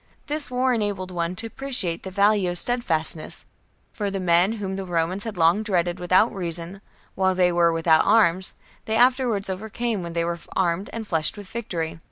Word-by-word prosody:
This 295 Hz, -1 st, -3 dB
war 255 Hz, +1 st, +1 dB
enabled 205 Hz, -5 st, -2 dB
one 170 Hz, 0 st, -2 dB
to 225 Hz, -, -5 dB
appreciate 225 Hz, -8 st, -3 dB
the 190 Hz, -, -7 dB
value 200 Hz, 0 st, +2 dB
of 175 Hz, -, -2 dB
steadfastness; 165 Hz, -10 st, -1 dB, 0.5 s
for 205 Hz, -2 st, -2 dB
the 195 Hz, 0 st, -3 dB
men 180 Hz, +3 st, +3 dB
whom 195 Hz, -4 st, -4 dB
the 195 Hz, -, -4 dB
Romans 175 Hz, +3 st, -1 dB
had 220 Hz, -4 st, -5 dB
long 170 Hz, +5 st, +4 dB
dreaded 180 Hz, -4 st, 0 dB
without 185 Hz, +6 st, +3 dB
reason, 175 Hz, 0 st, -4 dB, 0.3 s
while 190 Hz, -1 st, +1 dB
they 180 Hz, -1 st, +3 dB
were 170 Hz, -1 st, +3 dB
without 165 Hz, -1 st, +3 dB
arms, 185 Hz, -4 st, +3 dB, 0.3 s
they 220 Hz, -, -1 dB
afterwards 245 Hz, -4 st, +3 dB
overcame 215 Hz, +3 st, -3 dB
when 170 Hz, -1 st, -6 dB
they 170 Hz, 0 st, 0 dB
were 170 Hz, 0 st, -3 dB, 0.2 s
armed 185 Hz, +1 st, 0 dB
and 230 Hz, -1 st, -5 dB
flushed 160 Hz, -1 st, -1 dB
with 205 Hz, -2 st, -9 dB
victory. 170 Hz, -9 st, -4 dB
190 Hz, 185 wpm, -24 LUFS, 170-220 Hz, 0.5 s, long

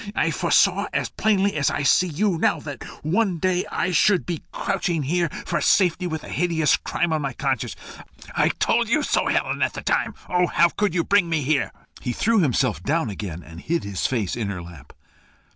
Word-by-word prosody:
I -, -, +1 dB
foresaw, -, -, +2 dB
as -, -, -1 dB
plainly 200 Hz, -2 st, +1 dB
as 150 Hz, -2 st, +2 dB
I 145 Hz, -, -2 dB
see 185 Hz, +5 st, +4 dB
you 175 Hz, +2 st, 0 dB
now, -, -, +2 dB
that 145 Hz, -5 st, -7 dB, 0.2 s
one 185 Hz, +3 st, +1 dB
day 185 Hz, +2 st, 0 dB
I 185 Hz, -, -1 dB
should 180 Hz, +3 st, +3 dB
be 170 Hz, -3 st, -4 dB
crouching 175 Hz, -5 st, -1 dB
here 170 Hz, +4 st, 0 dB, 0.2 s
for 170 Hz, -3 st, -1 dB
safety 180 Hz, +2 st, +3 dB
with 160 Hz, -2 st, -4 dB
a -, -, -10 dB
hideous 165 Hz, -3 st, +2 dB
crime 170 Hz, -2 st, -1 dB
on 155 Hz, -, 0 dB
my 140 Hz, -3 st, -3 dB
conscience. 135 Hz, -2 st, -2 dB, 0.6 s
I -, -, +3 dB
told -, -, +1 dB
you -, -, +2 dB
so, -, -, +1 dB
Helen, -, -, 0 dB
at -, -, +1 dB
the -, -, -7 dB
time. -, -, 0 dB
Oh! 180 Hz, 0 st, +2 dB
how 170 Hz, 0 st, +4 dB
could 200 Hz, 0 st, -1 dB
you 170 Hz, -, +2 dB
bring 200 Hz, -3 st, +2 dB
me 160 Hz, -3 st, 0 dB
here?" 145 Hz, +1 st, +1 dB, 0.3 s
He 125 Hz, -, -2 dB
threw 225 Hz, -, +2 dB
himself 135 Hz, -5 st, +1 dB
down 150 Hz, -6 st, 0 dB
again, 90 Hz, -4 st, -6 dB
and 80 Hz, +2 st, -11 dB
hid 170 Hz, +1 st, -1 dB
his 100 Hz, -2 st, -2 dB
face 115 Hz, -8 st, -1 dB
on 115 Hz, -4 st, -3 dB
her 90 Hz, -3 st, -5 dB
lap. 80 Hz, -5 st, -13 dB
160 Hz, 205 wpm, -23 LUFS, 130-180 Hz, 0.6 s, see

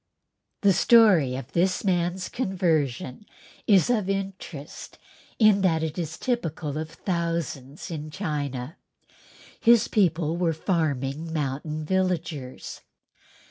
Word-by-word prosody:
The 200 Hz, -2 st, +5 dB
story 190 Hz, -, +5 dB
of 135 Hz, +1 st, -7 dB
this 185 Hz, +2 st, +1 dB
man's 180 Hz, -1 st, 0 dB
conversion 165 Hz, -, -1 dB, 0.4 s
is 195 Hz, -5 st, +5 dB
of 210 Hz, -5 st, 0 dB
interest 190 Hz, -6 st, -5 dB, 0.4 s
in 215 Hz, -3 st, +5 dB
that 165 Hz, -4 st, +2 dB
it 160 Hz, +2 st, -3 dB
is 160 Hz, -2 st, -4 dB
typical 165 Hz, -, -2 dB
of 155 Hz, 0 st, -5 dB
thousands 165 Hz, -5 st, -3 dB
in 155 Hz, -1 st, -5 dB
China. 145 Hz, -5 st, -4 dB, 0.8 s
His 235 Hz, -2 st, +5 dB
people 170 Hz, -5 st, +1 dB
were 170 Hz, -2 st, +1 dB
farming 155 Hz, -3 st, -1 dB
mountain 150 Hz, +1 st, -3 dB
villagers. 165 Hz, -7 st, -2 dB
165 Hz, 105 wpm, -25 LUFS, 150-190 Hz, 0.8 s, The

